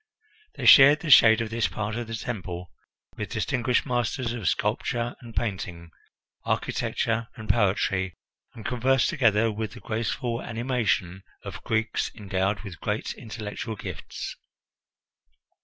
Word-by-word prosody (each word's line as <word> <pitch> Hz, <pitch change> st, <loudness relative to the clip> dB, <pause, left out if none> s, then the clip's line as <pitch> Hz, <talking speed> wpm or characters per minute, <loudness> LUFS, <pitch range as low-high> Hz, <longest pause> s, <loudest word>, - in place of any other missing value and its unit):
They -, -, -5 dB
shared 145 Hz, +2 st, +9 dB
the 160 Hz, -4 st, -1 dB
shade 110 Hz, -3 st, +8 dB
of 115 Hz, -1 st, -3 dB
this 115 Hz, -1 st, +1 dB
part 105 Hz, 0 st, -4 dB
of 120 Hz, -1 st, -4 dB
the 115 Hz, -, -4 dB
temple 90 Hz, -7 st, -5 dB, 0.5 s
with -, -, -4 dB
distinguished 125 Hz, -1 st, 0 dB
masters 120 Hz, 0 st, -1 dB
of 110 Hz, -7 st, -4 dB
sculpture 120 Hz, +9 st, -1 dB
and 115 Hz, -2 st, -11 dB
painting, 90 Hz, -6 st, -3 dB, 0.5 s
architecture 115 Hz, 0 st, -1 dB
and 110 Hz, -3 st, -9 dB
poetry, 95 Hz, -3 st, +1 dB, 0.4 s
and 110 Hz, -, -10 dB
conversed 125 Hz, +1 st, +2 dB
together 115 Hz, -7 st, +3 dB
with 110 Hz, 0 st, -4 dB
the -, -, -10 dB
graceful 115 Hz, +2 st, -2 dB
animation 110 Hz, -6 st, -1 dB, 0.2 s
of -, -, -8 dB
Greeks 110 Hz, 0 st, 0 dB
endowed 100 Hz, -1 st, -1 dB
with 100 Hz, -6 st, -9 dB
great -, -, -2 dB
intellectual 110 Hz, 0 st, -6 dB
gifts. -, -, -7 dB
110 Hz, 130 wpm, -26 LUFS, 105-120 Hz, 0.5 s, shared